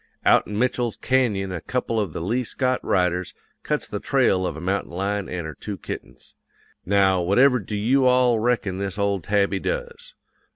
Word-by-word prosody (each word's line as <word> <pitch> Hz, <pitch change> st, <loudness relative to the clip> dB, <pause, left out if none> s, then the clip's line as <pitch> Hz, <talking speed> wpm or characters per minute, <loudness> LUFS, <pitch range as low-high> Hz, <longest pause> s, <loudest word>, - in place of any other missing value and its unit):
Out -, -, +5 dB
in 105 Hz, -, -4 dB
Mitchell's 120 Hz, -1 st, 0 dB
canyon 110 Hz, -8 st, +1 dB
a 85 Hz, -3 st, -4 dB
couple 120 Hz, -3 st, -2 dB
of 100 Hz, -6 st, -1 dB
the -, -, -5 dB
Lee 115 Hz, +9 st, 0 dB
Scott 130 Hz, +1 st, -1 dB
riders 90 Hz, -1 st, 0 dB, 0.3 s
cuts -, -, -2 dB
the -, -, -4 dB
trail 95 Hz, -1 st, +2 dB
of 75 Hz, -, -5 dB
a -, -, -6 dB
mountain 95 Hz, +4 st, -2 dB
lion 100 Hz, +3 st, -2 dB
and 90 Hz, -2 st, -4 dB
her 80 Hz, -, -6 dB
two 100 Hz, +4 st, -7 dB
kittens. -, -, -9 dB, 0.5 s
Now 95 Hz, -1 st, +3 dB
whatever 125 Hz, +9 st, +4 dB
do 105 Hz, 0 st, -5 dB
you 130 Hz, +5 st, +3 dB
all 125 Hz, -2 st, +4 dB
reckon 110 Hz, -5 st, 0 dB
this 100 Hz, 0 st, -3 dB
old 100 Hz, -3 st, 0 dB
tabby 100 Hz, +1 st, +1 dB
does? -, -, -5 dB
105 Hz, 180 wpm, -23 LUFS, 95-125 Hz, 0.5 s, Out